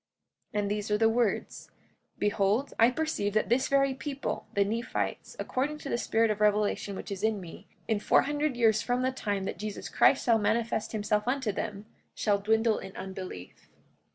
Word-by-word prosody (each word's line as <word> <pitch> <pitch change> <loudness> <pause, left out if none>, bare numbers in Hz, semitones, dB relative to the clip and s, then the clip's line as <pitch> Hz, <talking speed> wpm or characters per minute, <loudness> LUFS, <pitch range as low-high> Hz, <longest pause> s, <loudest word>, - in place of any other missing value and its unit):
45:10 - - +2
And 200 -1 -1
these 210 0 -2
are 210 - +2
the 225 +1 +4
words: 230 -2 -1 0.5
Behold, 205 +5 +1
I 230 +1 +7
perceive 255 -8 -1
that 215 - +2
this 255 +3 +2
very 275 -1 +3
people, 275 +1 -4
the 200 0 +3
Nephites, 230 +4 -3
according 285 +4 -2
to 285 - -7
the - - 0
spirit 225 -1 +2
of 210 0 -3
revelation 210 -1 +1
which - - -7
is 195 - -4
in 220 -1 +1
me, 175 -3 -11 0.2
in 220 -2 +1
four - - +4
hundred 290 -2 -1
years 220 -3 +4
from 245 +2 0
the 260 - +1
time 205 -6 -2
that 195 - -4
Jesus 210 -1 -5
Christ - - +4
shall 230 -2 +4
manifest 220 +1 0
himself 210 0 0
unto 255 -4 0
them, 205 0 -5 0.3
shall 205 -2 +1
dwindle 220 +2 +2
in 190 - -9
unbelief. 185 - -8
220 Hz, 185 wpm, -29 LUFS, 205-245 Hz, 0.5 s, I